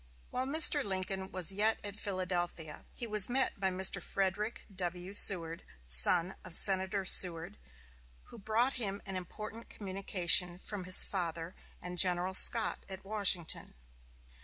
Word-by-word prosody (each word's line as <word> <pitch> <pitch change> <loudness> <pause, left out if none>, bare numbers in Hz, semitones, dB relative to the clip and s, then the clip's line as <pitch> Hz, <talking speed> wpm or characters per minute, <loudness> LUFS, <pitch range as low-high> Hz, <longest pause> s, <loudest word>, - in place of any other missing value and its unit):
While 255 +1 -7
Mr. 300 0 +5
Lincoln 190 -1 -6
was 185 -1 -4
yet 215 +3 -2
at 205 -1 -9
Philadelphia, 180 -5 -8
he 240 - -11
was 210 -2 -1
met 260 -4 -4
by 190 -1 -4
Mr. 190 0 -2
Frederick 200 +3 -7
W. 180 +1 -9
Seward, 170 -5 +5 0.2
son 65 - +6
of 180 -2 +1
Senator 190 0 +1
Seward, 175 +1 +1 0.6
who 235 - -15
brought 225 +6 -4
him 200 -2 -8
an 195 - -10
important 215 +5 -13
communication 185 -3 -3
from 195 0 -10
his 185 +1 +8
father 170 -2 -8 0.3
and 180 0 -7
General 180 0 -1
Scott 225 +3 +3
at 190 0 -12
Washington. 195 -5 -4
190 Hz, 135 wpm, -28 LUFS, 180-210 Hz, 0.6 s, his